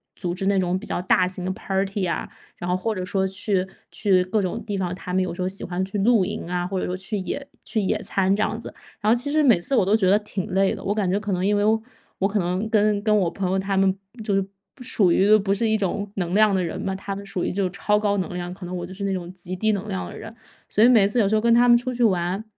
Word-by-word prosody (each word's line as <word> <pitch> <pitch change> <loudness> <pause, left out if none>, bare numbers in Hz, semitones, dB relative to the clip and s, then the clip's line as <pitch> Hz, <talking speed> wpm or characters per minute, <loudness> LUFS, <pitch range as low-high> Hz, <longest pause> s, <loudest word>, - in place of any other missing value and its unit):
组 175 -2 -3
织 190 +1 -4
那 200 -1 +3
种 185 0 0
比 220 - -9
较 - - -2
大 180 0 +3
型 185 -1 -5
的 190 - -1
party 195 -1 -2
啊， - - -3 0.3
然 175 - -5
后 180 - +2
或 220 +3 -2
者 185 - -3
说 190 +1 0
去 190 -1 -1 0.2
去 190 -4 +2
各 200 +3 0
种 190 +5 -3
地 205 -2 -3
方， 180 -2 -2
他 180 -1 -7
们 190 - +2
有 185 - -3
时 180 - -6
候 180 - 0
喜 195 - -6
欢 180 +1 -2
去 195 +2 -4
露 220 -1 +4
营 210 -3 -5
啊， 175 0 -1
或 185 0 -2
者 - - -2
说 180 - -2
去 195 +3 -4
野 275 +9 -4 0.2
去 220 - -1
野 190 - 0
餐 195 0 +1
这 210 - 0
样 220 - 0
子。 - - -7 0.3
然 210 +2 +3
后 - - +6
其 285 +3 -1
实 305 0 +3
每 230 -10 +5
次 270 +10 -1
我 195 - +4
都 205 +3 +3
觉 185 -3 +2
得 205 - +6
挺 210 -3 -5
累 195 0 +3
的， - - -7
我 205 - 0
感 200 -4 0
觉 200 - +1
可 210 -1 -4
能 180 +1 0
因 205 +1 +2
为 205 - +1 0.6
我 190 - +1
可 205 0 0
能 180 +4 -1
跟 210 -2 +2
跟 215 -1 +3
我 175 -3 +1
朋 190 0 -3
友 190 - +1
他 195 0 -1
们 190 -1 +4 0.3
就 205 -2 -1
是 195 - +3 0.3
不 250 - -11
属 195 -6 +2
于 205 +4 +5
不 195 -1 0
是 225 +3 0
一 220 - +3
种 205 +1 -2
能 180 -2 -2
量 215 0 +5
的 185 -2 +1
人 165 - -4
嘛， 190 -1 -2
他 195 0 -5
们 200 - -7
属 195 -2 -3
于 - - -1
就 195 +1 0
是 - - 0
超 210 +2 +1
高 205 -1 +1
能 185 -2 -3
量， 175 0 -4
可 185 -1 -9
能 180 +1 -5
我 175 0 -4
就 - - -12
是 200 - -6
那 195 -1 0
种 175 -1 -5
极 185 0 -6
低 220 +3 +1
能 205 +1 -3
量 190 -2 -4
的 - - -9
人， 220 - -8 0.4
所 215 - +2
以 - - +8
每 220 -6 +6
次 235 +4 0
有 200 -3 +3
时 220 - +2
候 215 - +2
跟 235 0 +4
他 240 +1 +5
们 240 0 +7
出 250 +1 -3
去 245 - 0
玩， 185 -1 +1
195 Hz, 340 characters per minute, -23 LUFS, 185-210 Hz, 0.6 s, 以